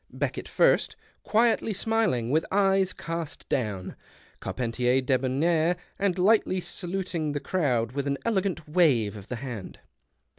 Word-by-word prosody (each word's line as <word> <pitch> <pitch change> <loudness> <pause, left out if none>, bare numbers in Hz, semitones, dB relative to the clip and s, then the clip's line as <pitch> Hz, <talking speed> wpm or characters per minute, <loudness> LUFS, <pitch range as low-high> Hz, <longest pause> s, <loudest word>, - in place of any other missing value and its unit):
Beckett - - -3
first, - - +3 0.3
quietly 225 0 +2
smiling, 200 - 0
with 155 +2 +3
eyes 195 -1 +3
cast 165 -2 -6
down, 105 -7 -2 0.4
Carpentier 125 +1 0
debonair 140 +7 +1 0.2
and 195 -2 +1
lightly 190 0 +3
saluting 175 -4 -3
the 145 - -1
crowd 125 -11 0
with 140 +1 -3
an 140 0 0
elegant 190 -8 -1
wave 145 - +3
of 100 -1 -10
the 125 - -4
hand. 120 -6 -7
155 Hz, 125 wpm, -27 LUFS, 125-190 Hz, 0.4 s, first